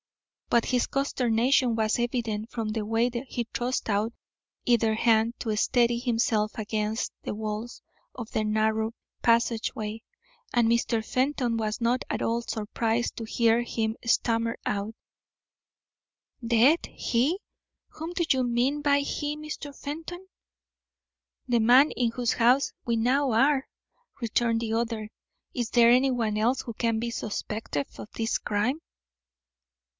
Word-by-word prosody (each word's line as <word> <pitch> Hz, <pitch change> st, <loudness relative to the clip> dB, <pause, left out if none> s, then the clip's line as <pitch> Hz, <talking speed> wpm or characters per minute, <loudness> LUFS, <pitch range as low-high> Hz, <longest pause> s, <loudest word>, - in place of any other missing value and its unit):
But 235 Hz, -1 st, +3 dB
his 250 Hz, -1 st, +1 dB
consternation 250 Hz, -2 st, +2 dB
was 220 Hz, +1 st, +1 dB
evident 230 Hz, -2 st, -2 dB
from 225 Hz, -2 st, -3 dB
the 215 Hz, 0 st, -2 dB
way 225 Hz, +3 st, +1 dB, 0.2 s
he 240 Hz, -2 st, -3 dB
thrust 250 Hz, +2 st, -1 dB
out 215 Hz, +2 st, 0 dB, 0.5 s
either 230 Hz, -2 st, +3 dB
hand 225 Hz, +1 st, +3 dB
to 220 Hz, -2 st, -1 dB
steady 235 Hz, +2 st, +2 dB
himself 225 Hz, -3 st, 0 dB
against 215 Hz, 0 st, -2 dB
the -, -, -4 dB
walls 215 Hz, +2 st, -5 dB, 0.3 s
of 235 Hz, -3 st, -7 dB
the 215 Hz, -, 0 dB
narrow 220 Hz, +1 st, +1 dB, 0.3 s
passageway, 225 Hz, -2 st, 0 dB, 0.5 s
and 240 Hz, -2 st, +3 dB
Mr. 230 Hz, -1 st, +1 dB
Fenton 255 Hz, -2 st, 0 dB
was 220 Hz, 0 st, -2 dB
not 240 Hz, +2 st, +1 dB
at -, -, -2 dB
all 230 Hz, +1 st, 0 dB
surprised 225 Hz, +1 st, -2 dB
to 225 Hz, -, -4 dB
hear 230 Hz, +1 st, +2 dB
him 225 Hz, -2 st, -2 dB
stammer 230 Hz, 0 st, +1 dB
out: 210 Hz, +2 st, -2 dB, 1.5 s
"Dead! 240 Hz, +8 st, +4 dB
He! 270 Hz, +11 st, 0 dB, 0.5 s
Whom 320 Hz, +2 st, -7 dB
do 350 Hz, -2 st, 0 dB
you 260 Hz, -1 st, +3 dB
mean 250 Hz, +4 st, +1 dB
by 285 Hz, -1 st, +3 dB
he, 290 Hz, +1 st, -3 dB
Mr. 305 Hz, -1 st, -7 dB
Fenton?" 325 Hz, +6 st, -7 dB, 1.2 s
"The 240 Hz, -2 st, +2 dB
man 255 Hz, +6 st, +6 dB
in 240 Hz, -2 st, 0 dB
whose 240 Hz, 0 st, 0 dB
house 250 Hz, +4 st, +3 dB
we 235 Hz, -1 st, +1 dB
now 260 Hz, +4 st, +2 dB
are," 270 Hz, +4 st, +3 dB, 0.5 s
returned 230 Hz, -1 st, +1 dB
the 225 Hz, -1 st, -2 dB
other. 225 Hz, -2 st, -2 dB, 0.4 s
"Is 240 Hz, -2 st, -2 dB
there 235 Hz, -1 st, +6 dB
anyone 245 Hz, -4 st, +2 dB
else 235 Hz, +5 st, +2 dB
who 235 Hz, -, -7 dB
can 230 Hz, 0 st, 0 dB
be 235 Hz, +1 st, -2 dB
suspected 210 Hz, -9 st, -3 dB
of -, -, -8 dB
this 225 Hz, 0 st, -1 dB
crime?" 220 Hz, +9 st, -1 dB
235 Hz, 135 wpm, -27 LUFS, 220-250 Hz, 1.5 s, man